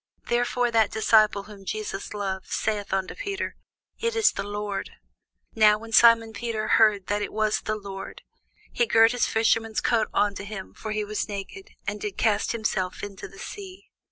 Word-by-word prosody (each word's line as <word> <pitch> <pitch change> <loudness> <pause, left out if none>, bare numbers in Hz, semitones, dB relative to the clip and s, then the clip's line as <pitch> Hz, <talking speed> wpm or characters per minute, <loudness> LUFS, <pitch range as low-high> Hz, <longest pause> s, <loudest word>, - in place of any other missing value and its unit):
Therefore 245 0 +1
that 225 -2 +3
disciple 215 -2 +3
whom 200 -1 -13
Jesus 210 0 -5
loved 195 -2 -3
saith 210 -2 -2
unto 190 0 -1
Peter, 400 -5 -4 0.4
It 465 0 -1
is 445 -1 +4
the - - -4
Lord. 205 0 -4 0.6
Now 210 -1 +5
when 225 +1 -11
Simon 230 -1 +6
Peter 215 0 -3
heard 210 -4 +4
that 205 +1 -1
it - - -3
was 215 0 0
the 215 - -2
Lord, 195 -2 -8 0.5
he 475 - +1
girt 225 - +6
his 245 -1 +1
fisher's 225 0 +1
coat 225 -3 +1
unto 205 -1 0
him, 200 -2 -7
(for 215 - -6
he 215 0 -1
was 210 +1 -3
naked,) 210 - -7 0.2
and 205 +1 -4
did 205 -2 -4
cast 215 -2 +1
himself 215 -5 -2
into 200 -2 -7
the 195 - -16
sea. 385 - -9
215 Hz, 175 wpm, -25 LUFS, 205-230 Hz, 0.6 s, Simon